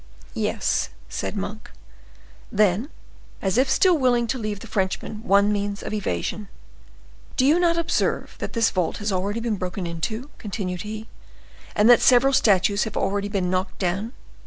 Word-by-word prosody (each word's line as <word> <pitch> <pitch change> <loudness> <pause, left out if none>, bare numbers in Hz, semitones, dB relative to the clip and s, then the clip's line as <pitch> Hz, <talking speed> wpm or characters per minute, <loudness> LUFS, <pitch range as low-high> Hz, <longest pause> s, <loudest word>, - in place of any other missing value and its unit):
"Yes," - - 0 0.2
said - - -4
Monk. - - -5 0.8
Then, 210 - +2 0.5
as 190 0 -1
if 260 0 +3
still 370 -2 +4
willing 250 -5 +2
to 260 - -1
leave 210 -2 -4
the - - -8
Frenchman 205 +1 -2
one 200 0 +4
means 205 0 -3
of - - -5
evasion,— 205 - -2 0.9
"Do 260 - +4
you 310 +5 +5
not 340 -1 +3
observe 335 0 0
that - - -5
this 230 -1 +2
vault 180 -4 -1
has 210 0 -2
already 200 +4 -1
been 225 -3 -1
broken 185 0 -4
into," 220 - -4
continued 185 -4 -4
he, 215 +2 -6 0.7
"and 210 - +4
that 245 0 +7
several 265 +2 +5
statues 200 -4 +3
have 220 - -5
already 200 +1 0
been 190 -3 -1
knocked 185 +1 -1
down?" 195 +6 -2
210 Hz, 160 wpm, -24 LUFS, 190-235 Hz, 0.9 s, that